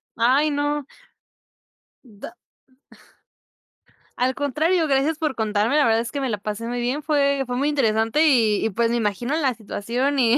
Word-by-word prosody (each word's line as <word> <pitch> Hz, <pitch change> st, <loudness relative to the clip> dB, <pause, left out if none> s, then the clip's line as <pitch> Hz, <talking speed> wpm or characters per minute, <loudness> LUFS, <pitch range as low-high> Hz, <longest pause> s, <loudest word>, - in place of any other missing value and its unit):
Ay, 265 Hz, +7 st, +2 dB
no. 290 Hz, 0 st, -1 dB, 1.2 s
Da. 215 Hz, -3 st, -11 dB, 1.8 s
Al 255 Hz, +1 st, +1 dB
contrario, 315 Hz, +5 st, 0 dB
gracias 280 Hz, +3 st, +1 dB
por 305 Hz, -4 st, -1 dB
contarme, 215 Hz, +3 st, 0 dB
la 295 Hz, -, +4 dB
verdad 225 Hz, 0 st, +3 dB
es 235 Hz, -, -6 dB
que 285 Hz, -, -4 dB
me 265 Hz, -2 st, -2 dB
la 210 Hz, -, -3 dB
pasé 210 Hz, +2 st, -5 dB
muy 245 Hz, 0 st, -3 dB
bien, 265 Hz, +5 st, -2 dB
fue 280 Hz, -3 st, +1 dB
fue 245 Hz, 0 st, -4 dB
muy 280 Hz, +3 st, 0 dB
interesante. 225 Hz, +1 st, +1 dB
Y 225 Hz, -8 st, +3 dB
y 220 Hz, -, -1 dB
pues, 230 Hz, +3 st, 0 dB
me 235 Hz, -, 0 dB
imagino 235 Hz, +5 st, -1 dB
la 270 Hz, -5 st, +1 dB
situación 240 Hz, +6 st, -3 dB
y 245 Hz, 0 st, +4 dB
255 Hz, 170 wpm, -22 LUFS, 225-290 Hz, 1.8 s, la